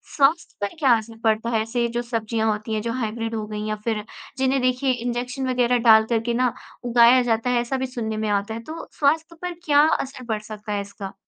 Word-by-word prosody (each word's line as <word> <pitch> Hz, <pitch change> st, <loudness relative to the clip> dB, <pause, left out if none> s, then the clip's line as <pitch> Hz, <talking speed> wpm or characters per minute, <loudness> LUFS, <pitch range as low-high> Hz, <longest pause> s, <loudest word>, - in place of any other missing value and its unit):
स्वास्थ्य 295 Hz, +4 st, +2 dB
पर 205 Hz, -, -2 dB
क्या 275 Hz, -5 st, +4 dB
असर 225 Hz, +1 st, -9 dB
पड़ता 220 Hz, +1 st, +1 dB
है 225 Hz, -2 st, +2 dB
ऐसे 235 Hz, +2 st, -1 dB
जो 240 Hz, -, +1 dB
सब्ज़ियाँ 225 Hz, -2 st, -1 dB
होती 215 Hz, +1 st, -4 dB
हैं, 215 Hz, -, -1 dB
जो 230 Hz, -, -3 dB
हाइब्रिड 225 Hz, 0 st, -3 dB
हो 215 Hz, -1 st, -3 dB
गईं, 210 Hz, 0 st, -5 dB
या 215 Hz, -, -1 dB
फिर 220 Hz, -2 st, -1 dB, 0.3 s
जिन्हें 265 Hz, 0 st, +1 dB
देखिए 255 Hz, +1 st, +1 dB
इंजेक्शन 245 Hz, +2 st, -3 dB
वग़ैरह 245 Hz, -1 st, +2 dB
डाल 220 Hz, 0 st, +8 dB
कर 230 Hz, -2 st, +2 dB
के -, -, +1 dB
ना 250 Hz, 0 st, +1 dB, 0.3 s
उगाया 240 Hz, +1 st, +6 dB
जाता 230 Hz, +1 st, 0 dB
है, 245 Hz, -1 st, +2 dB
ऐसा 240 Hz, +3 st, -2 dB
भी 260 Hz, -, -2 dB
सुनने 220 Hz, -4 st, -4 dB
में 215 Hz, 0 st, -1 dB
आता 205 Hz, +1 st, 0 dB
है? 225 Hz, -, -5 dB
तो 320 Hz, +6 st, -8 dB
स्वास्थ्य 320 Hz, +3 st, +1 dB
पर 360 Hz, -, -2 dB
क्या 290 Hz, -1 st, +5 dB
असर 260 Hz, -4 st, -2 dB
पड़ 220 Hz, -2 st, -1 dB
सकता 215 Hz, 0 st, -8 dB
है 205 Hz, -, -1 dB
इसका? 200 Hz, -1 st, -8 dB
235 Hz, 230 wpm, -23 LUFS, 220-255 Hz, 0.3 s, डाल